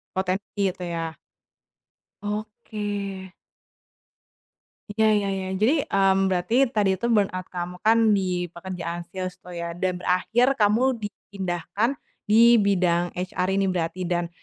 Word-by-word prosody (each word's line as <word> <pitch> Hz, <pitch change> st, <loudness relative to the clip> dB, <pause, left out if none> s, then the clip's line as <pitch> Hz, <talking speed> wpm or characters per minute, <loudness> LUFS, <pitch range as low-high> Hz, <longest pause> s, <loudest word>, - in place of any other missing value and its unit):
Potensi 190 Hz, +2 st, -2 dB
itu, 180 Hz, 0 st, -8 dB
ya. 165 Hz, -1 st, -3 dB, 1.1 s
Oke. 210 Hz, -2 st, -4 dB, 1.8 s
Iya 220 Hz, +1 st, +1 dB
iya 200 Hz, -1 st, 0 dB
iya. 190 Hz, 0 st, -4 dB
Jadi, 225 Hz, +10 st, +3 dB
mmm, 195 Hz, 0 st, +3 dB
berarti 225 Hz, +9 st, +2 dB
tadi 210 Hz, -5 st, +1 dB
itu 235 Hz, -, 0 dB
burnout 195 Hz, -5 st, +1 dB
kamu 180 Hz, 0 st, -5 dB
kan 225 Hz, +1 st, +4 dB, 0.2 s
di 180 Hz, -2 st, -1 dB
pekerjaan 175 Hz, -1 st, -5 dB
sales 185 Hz, -2 st, -4 dB
tuh 180 Hz, -1 st, -10 dB
ya, 170 Hz, 0 st, -4 dB
dan 180 Hz, +1 st, -1 dB
berakhir 220 Hz, +9 st, +2 dB
kamu 230 Hz, +4 st, +3 dB
dipindahkan 200 Hz, +4 st, -3 dB, 0.3 s
di 235 Hz, +2 st, +7 dB
bidang 175 Hz, -3 st, +2 dB
HR 180 Hz, 0 st, -2 dB
ini 195 Hz, -, +2 dB
berarti 180 Hz, +1 st, -2 dB
dan, 175 Hz, -1 st, -1 dB
190 Hz, 125 wpm, -25 LUFS, 180-210 Hz, 1.8 s, di